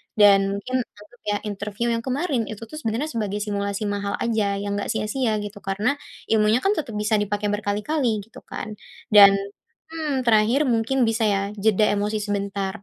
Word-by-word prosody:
dan 200 -2 +5
mungkin 255 +6 -2
untuk 205 - -17 0.2
ya, 205 0 -1
interview 210 +3 -3
yang 230 - 0
kemarin 260 - -1
itu 215 +1 -7
tuh 265 +8 -8
sebenarnya 260 +4 -2
sebagai 210 -3 -2
simulasi 200 0 -2
mahal 205 0 -2
aja 215 -4 +1
yang 200 0 -2
nggak - - -3
sia-sia 220 +1 0
gitu. 205 0 -7
Karena, 205 +9 -1 0.3
ilmunya 220 +2 +3
kan 395 - +3
tetap 275 - -3
bisa 210 +1 +1
dipakai 205 0 -1
berkali-kali 210 +3 -1
gitu 225 - -14
kan, 215 -2 -7 0.3
dan 200 -1 +9 0.5
mmm, 300 -5 -3
terakhir 230 +6 +4
mungkin 240 +1 +2
bisa 225 0 0
ya, 195 -1 +1
jeda 210 0 +2
emosi 210 +1 -1
sebentar 200 -2 -3
215 Hz, 170 wpm, -23 LUFS, 205-235 Hz, 0.5 s, dan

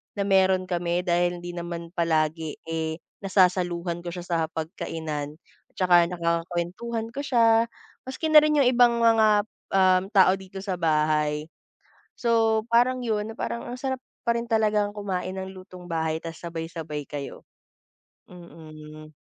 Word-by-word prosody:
na 200 - -1
meron 190 -1 +3
kami 175 -1 -1
dahil 175 0 +1
hindi 175 - -5
naman 170 -1 -6
palagi, 160 -2 0
eh, 160 -1 -3 0.2
nasasaluhan 180 -3 +1
ko 175 0 -7
siya 175 - -6
sa 175 -1 -2
hapag-kainan 155 -2 -5 0.3
at - - -38
saka 175 -2 +4
nakakakuwentuhan 175 +6 -3
ko 275 - -7
siya, 230 -4 +3 0.4
maski 310 +4 -3
na 305 - +10
rin 300 0 +2
'yong 270 -4 +5
ibang 240 -1 +5
mga, 225 -1 +5 0.5
um, 185 -1 +4
tao 190 -3 +5
dito 190 0 -9
sa 185 -3 -3
bahay. 155 -1 +1 0.7
So, 225 -2 +2
parang 245 +2 +3
'yon, 215 0 -1
na - - -14
parang 235 - -3
ang 250 - -6
sarap 260 -1 -3 0.2
pa 235 - +3
rin 235 - -2
talagang 210 -2 +2
kumain 190 -3 -4
ng 190 0 -6
lutong-bahay 175 -4 -4
ta's 165 -1 -9
sabay-sabay 165 -3 -6
kayo. 145 -1 -7 0.9
Mm. 155 -3 -12
180 Hz, 145 wpm, -25 LUFS, 165-220 Hz, 0.9 s, na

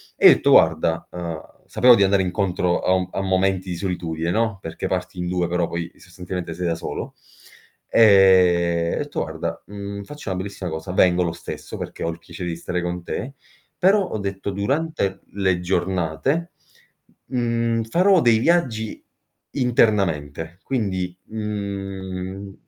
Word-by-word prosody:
E - - +7
io - - +9
etto: - - +1
"Guarda", 80 0 +4
uhm, 85 -3 -5 0.3
sapevo 125 -1 +6
di 100 - +4
andare 95 0 +3
incontro 90 -2 0
a - - +1
un 95 -1 +1
a 95 - -2
momenti 95 0 +1
di 85 - -3
solitudine, 85 -3 -2
no, 110 -2 0
perché 80 0 -5
parti 90 -1 -3
in 90 - -2
2, 90 -2 0
però 85 -1 0
poi 85 0 -4
sostanzialmente 90 -1 -6
sei 90 +2 -4
da 85 - 0
solo; 80 - -6 0.7
ehm, 90 -5 +5
ho - - -3
detto: - - -3
"Guarda, - - -4
mhmm, 100 0 -6
faccio 150 0 -8
una 95 - -2
bellissima 95 -2 -5
cosa, 80 +3 -5
vengo 90 -1 +4
lo 85 - -1
stesso, 85 - -8
perché - - -6
ho 85 - 0
il 85 +1 -6
piacere 85 +1 -7
di 85 - -3
stare 90 +1 -3
con 90 0 -4
te 135 +9 -4 0.4
però" 195 +3 +4
ho 145 - -4
detto: 100 0 -4
"Durante 100 -1 -1
le 95 -3 +1
giornate, 95 - -1 0.8
mhmm, 115 -2 0
farò 180 - +4
dei 115 -2 +4
viaggi 120 -9 +1 0.5
internamente, 90 - +1
quindi, 95 -8 -2
mhmm, 95 -2 -5
95 Hz, 155 wpm, -22 LUFS, 85-105 Hz, 0.8 s, io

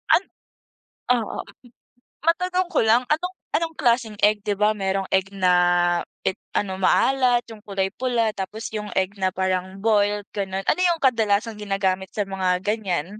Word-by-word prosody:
An 375 - +1 0.9
oo. 220 - -4 0.9
Matanong 360 +2 +1
ko - - +2
lang, 230 +3 +4
anong 360 +5 -1 0.2
anong 325 -1 -1
klaseng 235 -5 +1
egg? 210 0 +5
'Di 205 -1 -1
ba 210 +2 +3
merong 195 -1 -1
egg 190 +1 +1
na 185 -2 +3 0.7
it 190 - 0 0.2
ano 190 -2 -1
maalat, 250 +4 +3
'yung 215 -1 -12
kulay 195 -1 -2
pula, 235 -2 0
tapos 210 +4 -5
'yung 210 -1 -5
egg 190 +2 0
na 185 -1 +1
parang 185 0 -1
boiled 205 -2 +2
ganun. 195 -1 -3
Ano 360 - +1
'yung 345 -3 +2
kadalasang 220 -3 +1
ginagamit 195 -2 -1
sa 205 - +1
mga 185 -1 -1
ganiyan? 205 -2 -2
210 Hz, 155 wpm, -23 LUFS, 190-235 Hz, 0.9 s, egg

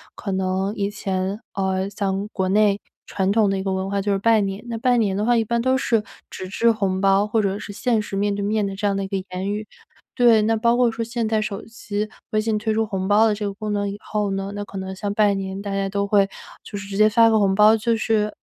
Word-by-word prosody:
可 200 - -5
能 190 +1 -1
以 200 -2 -1
前， 195 -1 -3
呃， 190 0 -1
像 200 0 -2
国 190 -2 -1
内 205 0 +3 0.2
传 190 0 -1
统 210 -1 +3
的 195 - 0
一 190 - -3
个 195 - -1
文 190 0 -2
化 200 0 -1
就 205 +1 -1
是 200 - +2
拜 220 +2 +3
年。 195 0 -3
那 230 -1 -4
拜 245 +1 +3
年 205 -4 +1
的 205 - -1
话， 240 0 +3
一 225 - +2
般 235 +2 0
都 260 +2 +2
是 230 -4 +1 0.3
纸 185 - -7
质 230 +4 +2
红 195 -4 -1
包， 195 +1 +3
或 220 +2 +1
者 195 -1 -1
是 205 - -7
现 230 +2 0
实 205 - -6
面 205 +1 +1
对 200 - -3
面 210 +1 0
的 195 0 -4
这 205 +2 -4
样 200 -1 0
的 195 - -2
一 - - -4
个 195 - -4 0.2
言 185 +2 -3
语。 210 +1 -3 0.5
对， 235 -3 +5
那 225 +1 +1
包 235 +2 +3
括 245 -1 +3
说 225 0 -3
现 235 0 -2
代 220 0 +1
手 205 -1 -4
机 215 -2 -4 0.2
微 215 - +2
信 220 0 0
推 215 +1 -1
出 220 +1 +1
红 190 -3 -3
包 210 +2 +5
的 215 - +2
这 210 0 -4
个 200 - -3
功 210 +1 -5
能 205 -1 -1
以 200 - -5
后 210 -2 -2
呢， 195 0 -3
那 205 0 -4
可 195 - -9
能 190 0 -5
像 200 +1 -3
拜 205 -1 +3
年， 195 0 -4
大 200 -1 -5
家 195 0 -1
都 200 +1 -1
会 200 -1 +4 0.4
就 205 - -7
是 200 0 -7
直 195 - -4
接 215 +1 +6
发 230 +1 +5
个 220 -1 +3
红 195 -2 +2
包， 215 +2 +6
就 230 +1 +1
是 215 -1 +1
205 Hz, 295 characters per minute, -22 LUFS, 195-220 Hz, 0.5 s, 接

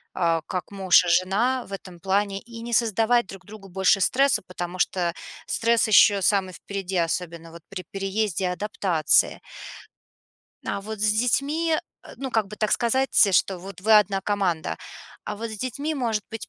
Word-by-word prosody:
а, 165 -3 +1
как 180 -2 -5
муж 190 -2 +4
и - - -4
жена 210 +9 +1
в 200 - -11
этом 185 -3 -9
плане, 195 +1 0
и 230 -1 -11
не 235 0 -6
создавать 230 +1 +2
друг 195 0 -11
другу 205 -1 -12
больше 190 +2 +2
стресса, 270 +2 +2
потому 180 0 -6
что 175 -1 0 0.3
стресс 230 0 +2
ещё 205 -1 +5
самый 190 -1 +1
впереди, 195 0 -5
особенно 165 0 -4
вот 170 0 -12
при 190 -2 -7
переезде 195 -1 -2
и - - +1
адаптации. 180 -4 +1 1.3
А - - -3
вот 215 +1 -7
с 215 0 +3
детьми, 285 +8 +1 0.3
э, - - -12
ну, 270 -1 -5
как 220 -4 +1
бы 210 - -9
так 215 0 0
сказать, 255 0 +3
э, 195 - -1
что 185 +1 +2
вот 190 0 -10
вы 215 +2 +5
одна 195 -1 0
команда. 190 -5 -1 0.5
А 210 - -5
вот 230 +1 -5
с 215 - -7
детьми, 280 +6 -3
может 230 -6 -1
быть, 225 -1 -7
200 Hz, 180 wpm, -24 LUFS, 185-225 Hz, 1.3 s, ещё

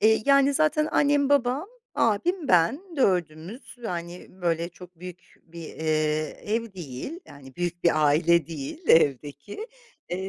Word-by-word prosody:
Eee, 220 0 +4
yani, 275 0 +5
zaten 305 0 +2
annem, 285 -1 +3
babam, 280 +4 +1 0.3
abim, 285 - 0
ben 205 - +3
dördümüz, 180 - -1
yani, 175 -4 -5
böyle 170 -2 -2
çok 180 0 -15
büyük 180 -1 -11
bir, 170 0 -11
eee, 155 -1 -1
ev 225 0 -2
değil, 175 - -7
yani, 135 -2 -14
büyük 175 0 -3
bir 155 -3 +4
aile 165 +2 +3
değil 165 - -7
evdeki, 145 - +1 0.4
eee, 190 +2 -4
180 Hz, 135 wpm, -25 LUFS, 160-260 Hz, 0.4 s, yani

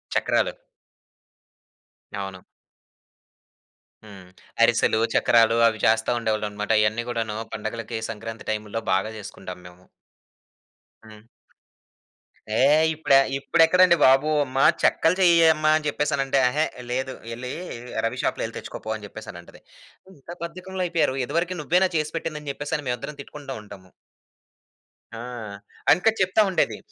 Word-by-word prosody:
చక్రాలు. - - +1 1.6
అవును. 95 -2 -5 1.7
హ్మ్. 95 -4 -13 0.3
అరిసెలు, 110 - +3 0.2
చక్రాలు 115 -1 +4
అవి 110 -1 -3
చేస్తా 110 +1 +3
ఉండేవాళ్ళనమాట. 105 -2 -2
ఇయన్నీ 110 +2 0
గూడాను 115 -3 -3 0.2
పండగలకి 115 +1 -5
సంక్రాంతి 115 +1 -8
టైముల్లో 110 +1 -3
బాగా 105 +4 -1
చేసుకుంటాం 95 -3 -9
మేము. 90 +1 -16 1.2
హ్మ్. 110 0 -15 1.3
ఏహ్! 145 +7 +4
ఇప్పుడ 155 -2 -1 0.2
ఇప్పుడెక్కడండి 170 +4 +4
బాబు! 135 +3 +5
అమ్మ 135 -1 -4 0.2
చెక్కలు 165 +3 +3
చెయ్యె 170 -2 +6
అమ్మ 155 0 -2
అని 155 -1 -3
చెప్పేసనంటే, 140 -2 0
"అహే! 150 +5 +1 0.3
లేదు. 130 +1 -2 0.2
యెళ్లి 125 +2 -6 0.5
రవి 115 - -2
షాపులో - - -1
యెళ్లి - - -6
తెచ్చుకోపో" 110 - -6
అని 105 - -11
చెప్పేసనంటది. 100 -5 -11 0.6
ఇంత 135 - -26
బద్ధకంలా 185 +2 -5
అయిపోయారు. 165 -6 0
ఇదివరకి 170 +7 -2
నువ్వేనా 180 +5 +3
చేసిపెట్టింది? 155 0 -3
అని 145 - -5
చెప్పేసని 145 +2 -4
మేవిద్దరం 135 +4 -4
తిట్టుకుంట 145 -2 -11
ఉంటాము. 100 -3 -14 1.2
ఆ! - - -7 0.7
ఎనక 180 +8 +4
చెప్తా 185 +3 +3
ఉండేది. - - 0
125 Hz, 115 wpm, -24 LUFS, 110-155 Hz, 1.7 s, చెయ్యె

